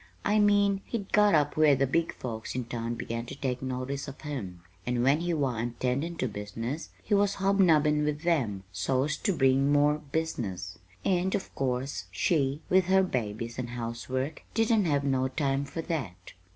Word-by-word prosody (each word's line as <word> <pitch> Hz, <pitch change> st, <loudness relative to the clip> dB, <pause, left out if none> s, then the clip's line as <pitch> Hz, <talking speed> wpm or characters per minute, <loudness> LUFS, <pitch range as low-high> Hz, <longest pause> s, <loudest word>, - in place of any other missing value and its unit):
I 210 Hz, +1 st, +3 dB
mean, 205 Hz, -1 st, +3 dB
he'd 205 Hz, -5 st, -4 dB
got 210 Hz, -4 st, +5 dB
up 145 Hz, -1 st, +2 dB
where 155 Hz, -2 st, +5 dB
the 135 Hz, +1 st, +2 dB
big 165 Hz, +5 st, +1 dB
folks 115 Hz, -2 st, -5 dB
in 125 Hz, -2 st, -2 dB
town 115 Hz, 0 st, -3 dB
begun 115 Hz, 0 st, -4 dB
to -, -, -7 dB
take 125 Hz, -2 st, -2 dB
notice 130 Hz, +2 st, -3 dB
of 140 Hz, -, -9 dB
him; 100 Hz, -, -6 dB, 0.2 s
and 120 Hz, +2 st, 0 dB
when 140 Hz, +4 st, +4 dB
he 175 Hz, +1 st, -1 dB
wa'n't 120 Hz, -6 st, -1 dB
tendin' 140 Hz, +7 st, -1 dB
to 130 Hz, -, -1 dB
business, 115 Hz, +8 st, -5 dB
he 210 Hz, -, -1 dB
was 200 Hz, 0 st, +3 dB
hobnobbin' 165 Hz, -7 st, +3 dB
with 150 Hz, +1 st, -2 dB
them, 120 Hz, -, 0 dB
so's 130 Hz, -, 0 dB
to -, -, 0 dB
bring 135 Hz, -3 st, +3 dB
more 145 Hz, +1 st, +4 dB
business. 95 Hz, -, -3 dB, 0.3 s
And 185 Hz, 0 st, +2 dB
of 200 Hz, -, -4 dB
course 130 Hz, -6 st, -2 dB
she, 140 Hz, -, +1 dB
with 185 Hz, 0 st, +4 dB
her 190 Hz, +1 st, +4 dB
babies 115 Hz, -, -3 dB
and 125 Hz, -1 st, -3 dB
housework, 125 Hz, +4 st, -4 dB
didn't 225 Hz, -2 st, +3 dB
have 145 Hz, -3 st, +1 dB
no 130 Hz, -1 st, +1 dB
time 135 Hz, 0 st, -1 dB
for 150 Hz, +4 st, -5 dB
that. 135 Hz, -, -5 dB
140 Hz, 180 wpm, -29 LUFS, 120-165 Hz, 0.3 s, got